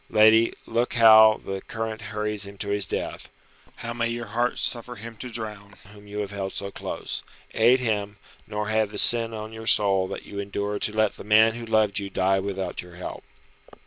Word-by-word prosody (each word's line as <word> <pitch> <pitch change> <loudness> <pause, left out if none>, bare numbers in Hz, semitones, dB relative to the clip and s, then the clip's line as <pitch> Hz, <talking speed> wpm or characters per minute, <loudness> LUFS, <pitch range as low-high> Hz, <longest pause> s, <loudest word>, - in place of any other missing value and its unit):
Lady, 110 +1 +5
look 120 +2 -1
how 110 -2 +7
the 95 0 -4
current 110 -1 -5
hurries 105 -1 -2
him 100 0 -11
to 100 0 -4
his 100 -1 -1
death. - - -5 0.5
How 115 - -6
may 115 0 -1
your 120 0 -4
heart 120 +3 -1
suffer 120 0 -2
him 115 0 -9
to 125 - -7
drown 105 -3 -7 0.2
whom 105 0 -15
you 105 0 -8
have 100 -1 -5
held 95 -1 -4
so 100 0 -4
close! - - -4 0.3
Aid 120 +4 +4
him, 105 -4 -2 0.3
nor 105 0 -3
have 110 -1 +1
the 105 - -8
sin 115 -1 +5
on 110 0 -7
your 110 0 -8
soul 95 -3 +4
that - - -7
you 100 - -7
endured 100 +1 -3
to - - 0
let 110 -1 +1
the - - -9
man 110 +2 +5
who 120 0 -8
loved 110 -2 +2
you 100 -1 -5
die 95 0 +1
without 95 -2 -4
your 90 -1 -14
help." 90 - -7
105 Hz, 205 wpm, -25 LUFS, 100-115 Hz, 0.5 s, how